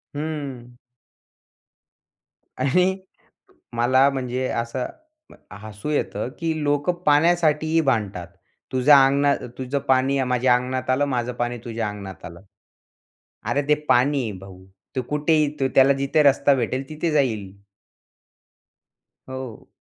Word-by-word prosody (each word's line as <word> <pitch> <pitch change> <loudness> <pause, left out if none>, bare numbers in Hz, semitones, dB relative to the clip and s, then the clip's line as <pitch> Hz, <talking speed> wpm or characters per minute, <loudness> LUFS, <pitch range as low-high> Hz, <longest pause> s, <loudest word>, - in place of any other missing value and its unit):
हं. 140 -5 -5 1.9
आणि 180 +9 +2 0.8
मला 130 +3 +4
म्हणजे 130 -1 -3
असं 120 +2 -3 0.8
हसू 110 +5 -7
येतं, 150 -4 -2
की 165 -1 -1
लोकं 145 +4 +1
पाण्यासाठीही 160 +1 +3
भांडतात. 105 - -1 0.4
तुझ्या 135 +2 +6
अंगणात 140 +1 +2 0.2
तुझं 130 +2 -2
पाणी, 135 +1 +2
माझ्या 125 0 +2
अंगणात 130 +1 -3
आलं 130 +3 +2
माझं 125 -3 -2
पाणी 120 0 -3
तुझ्या 115 -2 -3
अंगणात 100 -2 -9
आलं. 85 +1 -10 1.1
अरे 145 - +1
ते 150 - +6
पाणी 135 +3 +3
आहे 110 - -3
भाऊ. 95 -1 -13 0.3
तो 130 - 0
कुठेही 150 -2 +1
त्याला 135 +1 +4
जिथे 140 +3 +1
रस्ता 140 0 +4
भेटेल 130 +2 -3
तिथे 155 +1 -2
जाईल. 115 -10 0 1.8
हो. 130 -4 -8
130 Hz, 110 wpm, -23 LUFS, 120-145 Hz, 1.9 s, तुझ्या